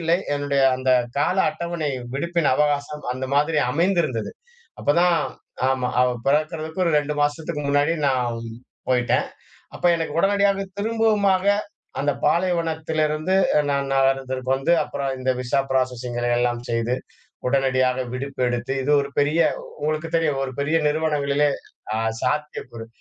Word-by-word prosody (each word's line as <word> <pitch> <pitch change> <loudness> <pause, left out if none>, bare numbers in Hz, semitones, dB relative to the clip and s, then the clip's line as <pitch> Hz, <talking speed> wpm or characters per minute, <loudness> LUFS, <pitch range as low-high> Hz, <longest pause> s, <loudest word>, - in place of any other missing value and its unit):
இல்லை. 165 +1 +2 0.2
என்னுடைய 145 -1 0 0.2
அந்த 130 0 0 0.3
கால 150 +6 +1
அட்டவணை 170 -3 -3 0.2
விடுப்பின் 170 +2 0
அவகாசம் 150 0 0
அந்த 130 +1 -4
மாதிரி 150 +2 +2
அமைந்திருந்தது. 165 - 0 0.5
அப்பதான் 170 +3 +3 0.5
ஆமா. 130 -1 0
அவ 125 - +3 0.2
பிறக்கறதுக்கு 155 +3 0
ஒரு 170 - +1
2 150 0 -2
மாசத்துக்கு 150 +1 -2
முன்னாடி 145 +3 +2
நான் 125 -3 0 0.5
போயிட்டேன். 125 -1 +2 0.5
அப்ப - - -4
எனக்கு 165 0 -3
உடனடியாக 200 0 +2
திரும்பவுமாக 210 -4 +2 0.5
அந்த 145 +1 +1
பாலைவனத்திலிருந்து 160 -1 0 0.4
நான் 140 -1 0
நகரத்திற்கு 135 -1 0
வந்து, 135 +5 0
அப்பறம் 135 -1 -3
இந்த 130 0 0
விசா 125 +2 0
ப்ராசஸிங்கிற 125 -2 -1
எல்லாம் 120 0 0
செய்து 115 +1 0 0.5
உடனடியாக 130 -1 +2
விடுப்பு 135 +1 -5
எடுத்து, 120 +1 -2
இது 145 - -1
ஒரு 140 - -3
பெரிய 150 +4 +2 0.4
உங்களுக்கு 155 +2 -1
தெரியும். 150 -4 +1
ஒரு 130 - -5
பெரிய 150 +3 +1
நிறுவனங்களிலே 150 -2 +1 0.5
அ - - 0 0.3
சாத்தியக்கூறு 130 -5 -3
145 Hz, 125 wpm, -23 LUFS, 130-165 Hz, 0.5 s, அப்பதான்